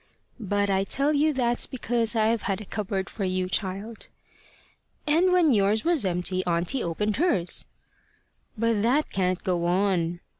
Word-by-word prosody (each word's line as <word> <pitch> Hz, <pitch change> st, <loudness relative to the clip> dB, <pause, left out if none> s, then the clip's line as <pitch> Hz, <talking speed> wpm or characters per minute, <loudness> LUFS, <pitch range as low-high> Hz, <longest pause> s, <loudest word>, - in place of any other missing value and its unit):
"But 205 Hz, -1 st, 0 dB
I 190 Hz, 0 st, +2 dB
tell 275 Hz, +9 st, +1 dB
you 305 Hz, +2 st, +3 dB
that's 240 Hz, -4 st, +1 dB
because 240 Hz, -3 st, 0 dB
I've 220 Hz, 0 st, +2 dB
had 195 Hz, -, -1 dB
a 215 Hz, -, -9 dB
cupboard 195 Hz, -1 st, -3 dB
for 205 Hz, -, -5 dB
you, 185 Hz, 0 st, -1 dB
child." 195 Hz, +4 st, -3 dB, 1.0 s
"And 330 Hz, +5 st, +3 dB
when 345 Hz, -6 st, +4 dB
yours 210 Hz, +1 st, +2 dB
was 330 Hz, -, +2 dB
empty, 180 Hz, +1 st, 0 dB
auntie 175 Hz, +9 st, 0 dB
opened 205 Hz, +5 st, -2 dB
hers." 215 Hz, -, 0 dB, 0.9 s
"But 230 Hz, -1 st, +1 dB
that 260 Hz, +7 st, +1 dB
can't 185 Hz, -1 st, -1 dB
go 175 Hz, -2 st, 0 dB
on." 175 Hz, -2 st, 0 dB
205 Hz, 150 wpm, -26 LUFS, 185-240 Hz, 1.0 s, when